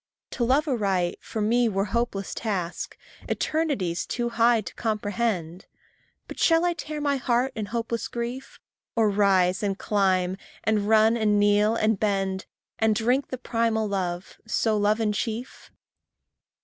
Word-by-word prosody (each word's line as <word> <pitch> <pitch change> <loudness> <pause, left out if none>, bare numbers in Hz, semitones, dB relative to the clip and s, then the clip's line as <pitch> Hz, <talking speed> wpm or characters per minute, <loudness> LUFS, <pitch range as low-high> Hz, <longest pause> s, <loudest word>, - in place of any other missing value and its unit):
To 240 - -2
love 275 +6 +2
aright, 195 -9 0
for 220 - -5
me 235 +2 +3
were 195 -1 0
hopeless 235 -5 -1
task, 185 -6 -3 0.3
Eternities 275 - -1
too 240 -1 -2
high 230 0 +3
to - - -8
comprehend. 205 -5 -2 0.6
But - - -9
shall 330 +1 +4
I 350 - +2
tear 305 -2 -6
my 285 -1 +1
heart 250 +1 +1
in 215 -2 -3
hopeless 230 0 -2
grief, 240 +3 -6 0.4
Or 220 -3 +3
rise 190 -2 +3
and 200 -2 -1
climb, 190 -3 +1 0.3
and 210 -1 +1
run 220 +1 +5
and 210 -2 +2
kneel, 205 +2 +3
and 215 -2 +1
bend, 195 -2 -1 0.3
And 220 -1 +3
drink 245 +6 +1
the 255 - -5
primal 230 -2 0
love 185 -2 -3
so 220 0 +1
love 210 +1 +2
in 215 -2 +1
chief? 225 +4 -4
220 Hz, 150 wpm, -25 LUFS, 200-235 Hz, 0.6 s, run